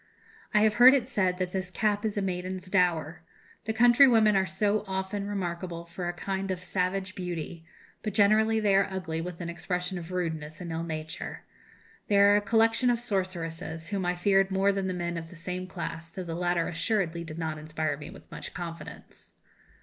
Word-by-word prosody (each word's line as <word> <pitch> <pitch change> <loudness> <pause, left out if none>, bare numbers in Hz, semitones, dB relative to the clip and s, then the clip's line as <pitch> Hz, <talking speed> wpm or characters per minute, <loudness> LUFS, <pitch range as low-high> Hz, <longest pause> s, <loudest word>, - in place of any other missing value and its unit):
"I 210 - +4
have 215 0 +4
heard 260 +2 +10
it 250 -3 0
said 185 -7 +1
that 180 -1 -2
this 185 -1 -2
cap 205 +2 0
is 215 -1 -1
a 200 - +1
maiden's 185 0 -4
dower. 170 -4 +1 0.4
The 220 - 0
country 240 +4 +7
women 220 -4 +5
are 190 -1 +2 0.4
often 190 +1 -3
remarkable 175 -3 -4
for 175 +1 -5
a - - 0
kind 195 +2 -3
of 185 -2 -2
savage 190 +1 -2
beauty, 170 -2 -5 0.4
but 215 -3 -4
generally 220 +2 +4
they 205 -2 +2
are 195 - +4
ugly, 170 -4 -3
with 180 0 -6
an 170 - -4
expression 180 +1 -3
of 170 +1 -9
rudeness 160 -4 -3
and 175 -2 -6
ill 165 0 -2
nature. 160 -1 -5 0.6
They 205 - +3
are 200 +1 +7
a - - +1
collection 225 +3 +3
of 240 -1 +2
sorceresses, 170 -6 -3
whom 200 -2 -1
I 180 0 0
feared 195 +1 +3
more 195 +1 +3
than 195 -1 -1
the 185 - -2
men 170 -1 -2
of 165 0 -9
the 180 - -12
same 180 +2 -4
class, 165 -3 -6
though 185 +3 -6
the 170 -2 -5
latter 175 0 0
assuredly 170 -1 -1
did 160 -1 -8
not 160 -2 -3
inspire 155 -1 -2
me 150 - -9
with - - -14
much - - -8
confidence. 165 -2 -9
185 Hz, 195 wpm, -28 LUFS, 170-200 Hz, 0.6 s, heard